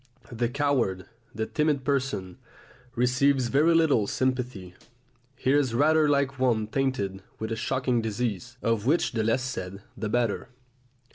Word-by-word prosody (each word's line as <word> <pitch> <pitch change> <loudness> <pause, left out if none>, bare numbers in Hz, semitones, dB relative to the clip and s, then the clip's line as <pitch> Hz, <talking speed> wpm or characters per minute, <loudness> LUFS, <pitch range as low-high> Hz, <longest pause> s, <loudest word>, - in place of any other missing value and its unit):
The 120 0 -1
coward, 125 -9 0 0.3
the 110 0 -1
timid 150 0 0
person, 125 -11 -2 0.6
receives 130 +1 +2
very 155 +6 +4
little 145 -11 +3
sympathy; 125 -9 -2 0.6
he 130 - 0
is 140 -5 +2
rather 155 +3 +4
like 140 -2 +1
one 120 -4 +2
tainted 110 -6 -2 0.2
with 110 +1 -4
a - - 0
shocking 125 +1 0
disease, 115 +1 -3
of 115 0 0
which 160 +5 +2
the 115 -2 -1
less 115 +4 +1
said 100 -6 -5
the 105 +1 -4
better. 120 0 0
125 Hz, 140 wpm, -27 LUFS, 110-135 Hz, 0.6 s, very